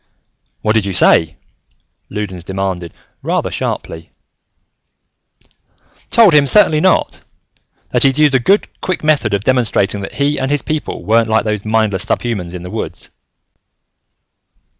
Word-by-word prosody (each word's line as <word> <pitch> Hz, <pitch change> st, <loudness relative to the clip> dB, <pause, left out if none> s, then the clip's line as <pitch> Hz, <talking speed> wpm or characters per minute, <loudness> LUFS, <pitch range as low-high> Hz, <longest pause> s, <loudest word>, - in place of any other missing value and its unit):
'" -, -, -50 dB
"What 110 Hz, -, +2 dB
did 110 Hz, -3 st, +1 dB
you 95 Hz, -, -3 dB
say?" 80 Hz, -3 st, +3 dB, 0.7 s
Loudons 95 Hz, -5 st, -5 dB
demanded 95 Hz, -2 st, -4 dB, 0.3 s
rather -, -, -2 dB
sharply. 80 Hz, 0 st, -5 dB, 2.0 s
"Told 225 Hz, -7 st, +5 dB
him 145 Hz, -2 st, +5 dB
certainly 155 Hz, -4 st, +4 dB
not, 185 Hz, -, +1 dB, 0.7 s
that -, -, 0 dB
he'd 135 Hz, 0 st, +4 dB
used 150 Hz, -2 st, +3 dB
a 130 Hz, -, +4 dB
good, 195 Hz, -, +2 dB
quick 185 Hz, -3 st, -3 dB
method 140 Hz, -9 st, +1 dB
of 100 Hz, -, -3 dB
demonstrating 110 Hz, -5 st, 0 dB
that 100 Hz, -, -7 dB
he 145 Hz, +2 st, -1 dB
and 135 Hz, 0 st, -2 dB
his 145 Hz, 0 st, -1 dB
people 155 Hz, -, -4 dB
weren't 115 Hz, +2 st, +2 dB
like 110 Hz, 0 st, +2 dB
those 105 Hz, -2 st, -3 dB
mindless 110 Hz, -3 st, 0 dB
subhumans 95 Hz, -8 st, -3 dB
in 90 Hz, -, -7 dB
the 90 Hz, -, -8 dB
woods." -, -, -6 dB
110 Hz, 140 wpm, -15 LUFS, 95-140 Hz, 2.0 s, Told